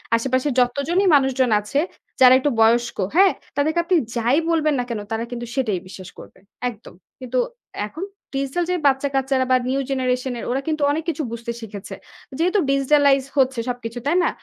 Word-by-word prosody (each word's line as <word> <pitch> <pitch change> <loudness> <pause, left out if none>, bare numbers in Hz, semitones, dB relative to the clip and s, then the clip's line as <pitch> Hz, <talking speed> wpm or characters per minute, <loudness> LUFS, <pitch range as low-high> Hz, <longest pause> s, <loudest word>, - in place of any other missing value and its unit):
আশেপাশের 260 +3 0
যতজনই 280 +10 +1
মানুষজন 265 -2 +2
আছে 210 +7 -2 0.4
যারা 255 0 +9
একটু 290 - +1
বয়স্ক, 235 +1 +3 0.2
হ্যাঁ? 385 +1 +6 0.3
তাদেরকে 315 +4 +1
আপনি 360 +1 +1 0.2
যাই 240 +5 +2
বলবেন 310 -2 +2
না - - 0
কেন 225 -3 -3
তারা 225 +1 -1
কিন্তু 240 0 -5
সেটাই 215 -9 0
বিশ্বাস 185 -1 -10
করবে, - - -14 0.3
একদম। 230 -2 -12 0.3
কিন্তু 255 -1 -4 0.5
এখন 320 - -7 0.3
digital 275 +6 -1
যে, 360 - +1
বাচ্চাকাচ্চারা 270 -1 +1
বা - - +6
new 275 +1 0
generation 255 -1 -1
এর - - -6
ওরা 270 +2 0
কিন্তু 310 -1 -1
অনেক 315 +2 -2
কিছু 315 -2 -2
বুঝতে 235 0 -5
শিখেছে। 205 -2 -8 0.4
যেহেতু 365 +5 +2
digitalize 275 0 +3
হচ্ছে 260 -2 +2
সবকিছু, 245 -1 -5
তাই 315 +5 +2
না? - - +2
265 Hz, 170 wpm, -21 LUFS, 240-290 Hz, 0.5 s, যারা